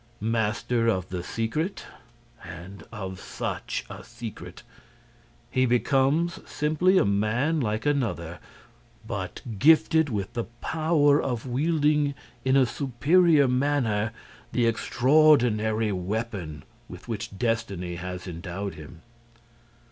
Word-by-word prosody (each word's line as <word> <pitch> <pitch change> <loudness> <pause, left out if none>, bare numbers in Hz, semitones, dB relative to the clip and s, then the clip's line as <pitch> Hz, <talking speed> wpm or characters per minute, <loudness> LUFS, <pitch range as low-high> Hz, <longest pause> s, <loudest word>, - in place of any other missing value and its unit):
Master 115 +2 0
of 95 -5 0
the 90 -1 -3
secret—and 110 - -6
of 95 -3 -6
such - - -4
a - - -9
secret!—he 120 +5 -7
becomes 135 +7 +2
simply 155 +6 +2
a - - +4
man 110 +11 +1
like 110 -2 -1
another, 110 - -1 0.7
but - - -5 0.2
gifted 160 +2 +5
with 100 -5 -3
the 115 - -2
power 155 -2 +3
of 120 -2 -3
wielding 150 +2 +1 0.3
in 130 +1 +3
a 135 - +5
superior 145 +5 +3
manner 125 -5 +1 0.4
the 120 - +2
extraordinary 115 -3 +3
weapon 95 -5 -4 0.3
with - - -11
which 100 - -5
destiny 100 -7 -2
has 90 0 -6
endowed 90 +3 -5
him. 80 +2 -12
115 Hz, 100 wpm, -26 LUFS, 100-145 Hz, 0.7 s, gifted